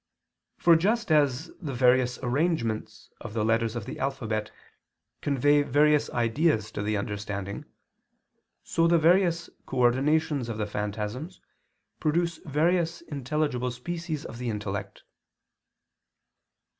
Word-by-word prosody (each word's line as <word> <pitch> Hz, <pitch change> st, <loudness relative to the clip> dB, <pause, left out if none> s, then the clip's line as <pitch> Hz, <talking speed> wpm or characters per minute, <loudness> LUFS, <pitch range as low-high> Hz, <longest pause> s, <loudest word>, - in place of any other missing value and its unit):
For 170 Hz, -1 st, +6 dB
just 215 Hz, +4 st, +1 dB
as 150 Hz, +1 st, +2 dB
the 140 Hz, -6 st, -4 dB
various 125 Hz, 0 st, +3 dB
arrangements 120 Hz, -6 st, -1 dB
of 115 Hz, -2 st, -8 dB
the 110 Hz, -2 st, +1 dB
letters 115 Hz, 0 st, +1 dB
of 115 Hz, -4 st, -4 dB
the 130 Hz, -, -7 dB
alphabet 110 Hz, -6 st, -2 dB, 0.7 s
convey 145 Hz, +1 st, +3 dB
various 150 Hz, +1 st, +3 dB
ideas 115 Hz, -1 st, +1 dB
to 105 Hz, -, -4 dB
the 105 Hz, +1 st, 0 dB
understanding, 100 Hz, -1 st, -4 dB, 1.0 s
so 165 Hz, 0 st, +2 dB
the 170 Hz, 0 st, +5 dB
various 170 Hz, +1 st, +3 dB, 0.2 s
coordinations 135 Hz, +2 st, +2 dB
of 110 Hz, -, -4 dB
the 105 Hz, -, -1 dB
phantasms 105 Hz, -, -4 dB, 0.6 s
produce 170 Hz, +2 st, 0 dB
various 165 Hz, +3 st, +1 dB
intelligible 145 Hz, -4 st, -2 dB
species 160 Hz, +5 st, -5 dB
of 115 Hz, -, -8 dB
the 125 Hz, -1 st, -2 dB
intellect. 105 Hz, -2 st, -5 dB
135 Hz, 115 wpm, -27 LUFS, 115-160 Hz, 1.0 s, For